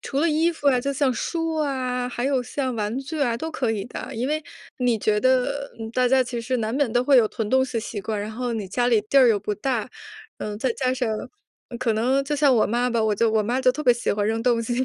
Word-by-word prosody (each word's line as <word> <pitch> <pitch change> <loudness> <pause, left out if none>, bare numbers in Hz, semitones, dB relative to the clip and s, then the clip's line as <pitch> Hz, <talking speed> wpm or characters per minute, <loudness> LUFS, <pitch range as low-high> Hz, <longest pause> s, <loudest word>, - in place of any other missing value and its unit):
除 275 +1 -2
了 335 - +3
衣 325 +3 +2
服 290 -3 0
啊， 250 -2 +3
就 280 +2 -2
像 270 -1 +1
书 325 +5 -2
啊， 255 -4 -1
还 245 0 -4
有 270 -2 +1
像 255 +1 -3
玩 210 +3 -2
具 305 +3 -6
啊 240 -4 +1
都 320 +6 -5
可 255 -7 -1
以 200 -2 -3
的， - - -7
因 245 +4 -2
为 310 +1 0 0.4
你 245 -2 +2
觉 210 0 +1
得， 260 +3 +1
呃， 220 0 -5
大 250 +1 +2
家 260 +1 +4
其 240 -1 -4
实 250 +2 -1
难 220 0 -2
免 275 -3 +1
都 245 0 +2
会 275 0 +4
有 230 -3 +6
囤 220 -1 -4
东 260 0 +4
西 255 - -9
的 - - -2
习 215 -2 -5
惯， 210 +1 -3
然 210 +1 -4
后 245 +2 -3
你 210 -4 -4
家 245 +5 0
里 230 -3 +4
地 275 +6 +3
儿 255 - +7
又 210 -3 +2
不 210 +1 -2
大， 240 +1 -2 0.5
呃， 210 -1 -4
再 245 +2 0
加 255 0 -1
上， 245 -3 -1 0.6
嗯， 240 - -7
可 225 -3 0
能 255 +5 +2
就 295 +1 -2
像 280 -3 +4
我 220 - +4
妈 240 +2 0
吧， 230 -2 0
我 215 -1 +2
就 230 +2 +2
我 220 -1 +2
妈 245 +5 -1
就 255 -1 +4
特 300 - -5
别 245 -3 +5
喜 240 - -1
欢 205 0 -1
扔 225 +1 0
东 235 -1 +2
西， 245 +3 -1
250 Hz, 300 characters per minute, -23 LUFS, 225-265 Hz, 0.6 s, 儿